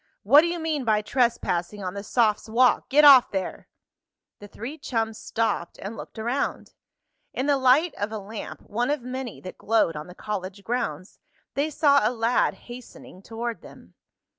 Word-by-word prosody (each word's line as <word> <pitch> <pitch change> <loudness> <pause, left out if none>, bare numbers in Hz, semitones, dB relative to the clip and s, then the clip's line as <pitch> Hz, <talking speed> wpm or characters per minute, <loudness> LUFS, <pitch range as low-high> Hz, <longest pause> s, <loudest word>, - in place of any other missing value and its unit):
What 280 +9 +7
do 340 - 0
you 345 +1 -2
mean 315 -4 -2
by 215 -2 +1
trespassing 210 -5 -1
on 180 -1 -4
the 200 - -5
sophs' 220 0 +1
walk. 245 +3 +3
Get 295 +2 +5
off 270 -4 +8
there!" 190 -1 -4 0.7
The 205 - -11
three 250 +10 -8
chums 225 -5 -2
stopped, 225 -6 -2
and 200 +4 -7
looked - - -10
around. 240 +6 -3 0.6
In 260 - -2
the 285 -1 +2
light 270 +6 +4
of 205 +1 -2
a 220 - -4
lamp, 210 +2 -8
one 240 +5 -2
of 290 -4 -1
many 255 -1 -6
that 185 - -10
glowed 215 -7 +1
on 150 +2 -7
the 180 - -12
college 200 -1 -6
grounds, 200 -7 -4 0.3
they 285 +3 0
saw 285 -2 +3
a 215 - +2
lad 235 0 +1
hastening 240 -6 -12
toward 230 +2 -5
them. - - -15
230 Hz, 175 wpm, -25 LUFS, 205-260 Hz, 0.7 s, off